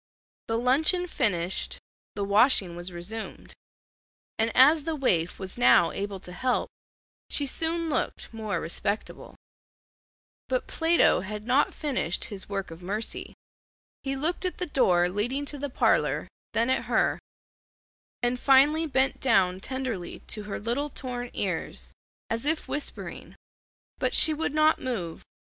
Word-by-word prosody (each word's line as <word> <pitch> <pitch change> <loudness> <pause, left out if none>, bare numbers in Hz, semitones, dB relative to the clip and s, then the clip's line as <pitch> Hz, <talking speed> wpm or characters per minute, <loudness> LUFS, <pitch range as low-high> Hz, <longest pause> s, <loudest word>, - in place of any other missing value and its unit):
The 225 - 0
luncheon 300 +9 +2
finished, 190 - 0 0.4
the 205 - -2
washing 200 -3 +3
was 175 +1 -4
resumed, 190 +6 -7 0.9
and 225 +1 +2
as 295 +5 +7
the 325 +1 -2
waif 180 - +1
was 190 +4 -7
now 175 -8 +6
able 200 -1 -4
to 180 - -8
help, 250 +8 -1 0.6
she 285 - 0
soon 330 +4 0
looked 300 - -2
more 220 -2 -3
respectable. 200 +5 -4 1.1
But - - 0
Plato 330 +1 +3
had 210 +3 -6
not 260 +4 +3
finished 260 - -2
his 195 -1 -6
work 195 -3 -3
of 165 +2 -10
mercy. 210 +5 -4 0.7
He 275 0 -2
looked 315 +8 -1
at 365 - -2
the 360 - -2
door 180 - +3
leading 240 +10 -2
to 290 0 -6
the 285 +1 -3
parlor, - - +1 0.3
then 235 +3 +2
at - - 0
her; - - +1 1.0
and 245 +1 +1
finally 290 +5 +5
bent 265 -2 +1
down 185 -7 +3
tenderly 255 -6 -4
to 210 -2 -4
her 205 - -4
little 245 +7 -2
torn 245 -3 -5
ears, 185 -5 -3 0.3
as 230 +5 -2
if 315 +1 +1
whispering, 290 - -5 0.6
but - - +1
she 315 - +7
would 305 -1 -2
not 310 +1 +4
move. 190 -11 -4
245 Hz, 140 wpm, -27 LUFS, 195-290 Hz, 1.1 s, as